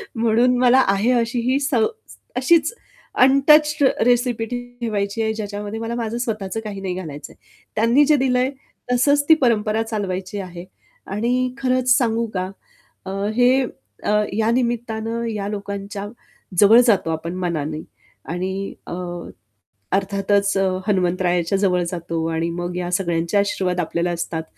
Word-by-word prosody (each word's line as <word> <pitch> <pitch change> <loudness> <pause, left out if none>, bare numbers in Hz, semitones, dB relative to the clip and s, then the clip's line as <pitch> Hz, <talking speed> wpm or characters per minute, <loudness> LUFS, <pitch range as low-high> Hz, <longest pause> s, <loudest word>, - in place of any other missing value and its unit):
म्हणून 235 +2 +3
मला 255 +1 +5
आहे 200 +5 +2
अशी 240 +1 -2
ही 275 - +2
स 285 0 -2 0.6
अशीच 320 - +3 0.5
अनटच्ड 300 +3 +4 0.2
रेसिपी 245 -2 +2
ठेवायची 235 -4 -3
आहे, 220 0 0
ज्याच्यामध्ये 210 0 -5
मला 230 +1 -3
माझं 230 0 -3
स्वतःचं 215 -2 -3
काही 200 -2 -6
नाही 185 -2 -3
घालायचंय. 155 -6 -8 0.4
त्यांनी 235 +7 +4
जे 300 +1 +4
दिलंय 255 0 +2 0.4
तसंच 285 +4 +3
ती - - +10
परंपरा 220 -2 +2
चालवायची 200 -3 -4
आहे. 180 -2 -8 0.4
आणि 245 +5 0
खरंच 255 -1 +2
सांगू 230 -3 +1
का 185 0 -2 0.6
अ, 190 - -5 0.2
हे 250 +2 +4 0.4
अ, - - 0 0.2
या 220 +2 +1
निमित्तानं 235 -2 -1
या 205 -2 -3
लोकांच्या 200 0 -5 0.5
जवळ 215 +3 +8
जातो 185 -7 +3
आपण 165 +2 -4
मनाने 155 -3 -2 0.5
आणि 190 +2 -3
अ, - - -5 1.0
अर्थातच 200 +1 +1 0.3
हनुमंतरायाच्या 180 -1 +1
जवळ 180 -3 +2
जातो 170 -2 -3
आणि 165 +1 -1
मग 175 +1 -4
या 175 -1 -3
सगळ्यांचे 170 0 -1
आशीर्वाद 185 -3 0
आपल्याला 170 +1 -1
असतात 165 -1 -3
210 Hz, 130 wpm, -21 LUFS, 185-245 Hz, 1.0 s, ती